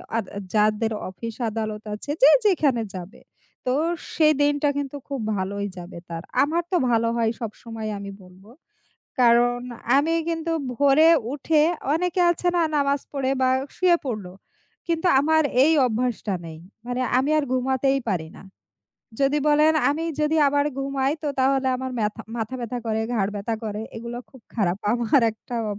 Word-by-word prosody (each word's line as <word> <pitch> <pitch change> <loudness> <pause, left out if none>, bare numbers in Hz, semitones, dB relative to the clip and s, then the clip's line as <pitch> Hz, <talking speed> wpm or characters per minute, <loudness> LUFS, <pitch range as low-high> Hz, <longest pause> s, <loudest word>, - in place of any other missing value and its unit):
আর 230 - +1 0.3
যাদের 215 +1 +2 0.2
অফিস 225 +4 -7
আদালত 215 -1 -4
আছে, 210 +7 -5
যে, 280 - +9 0.2
যেখানে 290 - +3
যাবে। 185 +5 -9 0.4
তো 250 - +1 0.4
সেই 310 -1 +5
দিনটা 290 0 +2
কিন্তু 285 0 -4
খুব 275 -2 -4 0.2
ভালোই 200 +2 -3
যাবে 175 0 -9
তার। 165 -1 -5 0.2
আমার 330 +4 0
তো 360 - +3
ভালো 230 0 +2
হয় 225 -1 +2
সবসময় 225 0 -6
আমি 200 0 -7
বলব। 185 +1 -17 0.8
কারণ 245 0 +4 0.4
আমি 315 +4 +2
কিন্তু 330 0 -2 0.2
ভোরে 285 +4 +5 0.2
উঠে 300 +2 +2 0.3
অনেকে 360 +2 0
আছে 350 +1 -1
না 340 - +3
নামাজ 280 0 +1
পড়ে 270 -2 -1
বা 260 - +3 0.3
শুয়ে 360 -2 +4
পড়ল। 215 -7 -3 0.6
কিন্তু 335 +1 +1
আমার 315 +2 +3 0.2
এই 315 - +4
অভ্যাসটা 230 -3 -1
নেই। 160 -1 -9 0.3
মানে 245 +1 -2 0.2
আমি 275 +3 +1
আর 300 - +1
ঘুমাতেই 265 +1 +1
পারি 170 -6 -1
না। - - -12 0.8
যদি 275 +2 +3
বলেন 300 +1 +5 0.2
আমি 320 +3 -2 0.2
যদি 300 +1 +1
আবার 285 +1 +1
ঘুমাই 275 0 0
তো 300 - -1
তাহলে 265 0 +2
আমার 260 0 -5
মেথা 215 +1 -2
মাথা 225 +2 -3
ব্যাথা 240 +1 -4
করে, 220 0 0
ঘাড় 200 -2 0
ব্যাথা 215 +3 -2
করে 210 0 -4 0.2
এগুলো 235 +1 -6
খুব 260 - -16
খারাপ। 190 -4 0
আমার 240 +3 +3
একটা 230 +2 -8
অব. 205 - -5
255 Hz, 160 wpm, -24 LUFS, 220-290 Hz, 0.8 s, যে